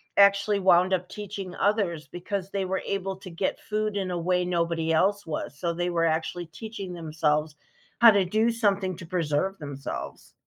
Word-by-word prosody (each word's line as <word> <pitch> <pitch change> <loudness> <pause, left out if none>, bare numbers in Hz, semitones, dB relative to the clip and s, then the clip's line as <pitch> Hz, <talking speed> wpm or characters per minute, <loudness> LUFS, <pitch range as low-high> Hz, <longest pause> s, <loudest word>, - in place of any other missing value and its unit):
actually 200 +1 +5
wound 185 0 +4
up 180 -1 -1
teaching 200 -3 -6
others 190 -7 0
because 185 +4 -4
they 195 -1 -1
were 190 0 -1
able 195 -1 -2
to 190 0 -10
get 170 +3 -2
food 215 -1 -2
in 190 -2 -2
a 175 - -1
way 180 +1 +1
nobody 170 -2 0
else 200 +5 +2
was, 150 -2 -4
so, 170 -1 -1
they 175 +1 -1
were 165 -1 +1
actually 165 +2 -1
teaching 195 +2 -7
themselves 155 -2 0 0.5
how 235 -1 +10
to 200 -2 +3
do 220 +5 +2
something 200 -5 +1
to 170 - -9
preserve 175 +2 0
themselves. 145 -4 -7
185 Hz, 180 wpm, -27 LUFS, 170-200 Hz, 0.5 s, how